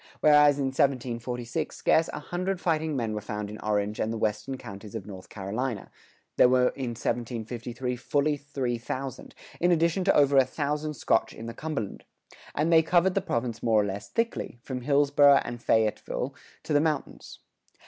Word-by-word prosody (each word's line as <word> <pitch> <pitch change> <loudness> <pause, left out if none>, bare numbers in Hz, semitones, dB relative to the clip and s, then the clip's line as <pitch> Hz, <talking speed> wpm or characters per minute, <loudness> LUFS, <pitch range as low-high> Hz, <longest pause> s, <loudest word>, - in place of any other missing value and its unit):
Whereas 150 -1 +6
in 140 - 0
1746 125 +1 -1
scarce 160 +1 +3
a - - -6
hundred 185 +4 -3
fighting 160 -3 0
men 115 -4 -1
were 105 - -3
found 105 0 -5
in 105 - -8
Orange 105 0 -1
and 110 - 0
the 115 - -3
western 110 +5 -2
counties 105 -2 -10
of 105 -4 -5
North 95 -3 -10
Carolina, 110 +3 -4 0.5
there 125 - +7
were 125 0 +4
in 125 -3 -5
1753 120 +2 -3
fully 145 +4 +1
three 135 -4 -3
thousand, 130 +2 -6 0.2
in 175 +1 +3
addition 170 +2 +2
to 195 - +4
over 140 -1 +5
a 135 - +8
thousand 150 +3 -3
Scotch 115 - +1
in 115 - -8
the 115 - -5
Cumberland; 135 -7 -4 0.5
and 160 +3 +2
they 160 - +8
covered 175 +3 +3
the 195 - +1
province 115 - -2
more 110 -2 +3
or 105 - +2
less 100 0 -5
thickly, 230 - -2
from 130 -2 -5
Hillsboro 145 +1 +5
and 120 0 -6
Fayetteville 110 -2 0 0.3
to - - -3
the 145 - +5
mountains. 155 -2 -3
130 Hz, 175 wpm, -27 LUFS, 115-150 Hz, 0.5 s, a